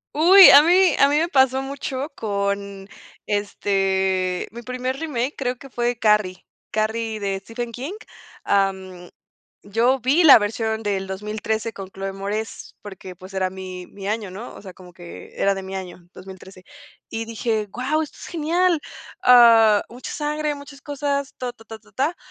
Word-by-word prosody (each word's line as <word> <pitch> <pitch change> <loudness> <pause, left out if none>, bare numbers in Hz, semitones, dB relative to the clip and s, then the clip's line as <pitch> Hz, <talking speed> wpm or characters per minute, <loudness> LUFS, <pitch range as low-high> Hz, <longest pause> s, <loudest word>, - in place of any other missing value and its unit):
Uy, 370 +6 +9
a 285 - +10
mí 360 0 +4
a 280 - +5
mí 290 - +2
me 325 +2 +1
pasó 265 -4 +3
mucho 270 0 -5
con, 200 -1 -3 0.4
este, 190 -2 -1
mi 235 +2 -9
primer 255 +2 -4
remake, 275 -3 -3
creo 250 -2 -2
que 275 - -13
fue 240 -1 -2
Carrie. 210 -4 +1 0.3
Carrie, 220 0 -2
de 195 -1 -2
Stephen 235 +4 -6
King, 260 - -6 0.5
am, 190 -2 -1 0.5
yo 235 +6 +1
vi 270 +8 +2
la 295 -4 +10
versión 220 +1 -2
del 195 -2 -2
2013 215 +3 -4
con 195 -2 -9
Chloë 195 0 -6
Moretz, 205 +3 -5
porque, 190 -3 -10
pues, 185 +2 -13
era 190 -1 -1
mi 185 -1 -8
mi 195 -1 -9
año, 210 -2 -3
¿no? 215 +6 -9
O - - -12
sea, 190 -2 -11
como 180 0 -15
que, 175 -1 -12
era 200 0 +1
de 195 - -6
mi 190 0 -7
año, 180 -2 -8
2013. 190 0 -13 0.5
Y 225 0 -4
dije: 225 -1 -2
"Guau, 270 +8 -1
esto 310 - -7
es - - -9
genial, 340 +1 +1 0.4
ah, 230 - +6
mucha 245 +2 -9
sangre, 300 0 -2
muchas 285 0 -12
cosas, 280 -1 -3
ta, 250 -1 -4
ta, 225 -2 -19
ta, 220 0 -10
ta, 210 -1 -24
tá". 280 - -1
220 Hz, 170 wpm, -22 LUFS, 195-265 Hz, 0.5 s, a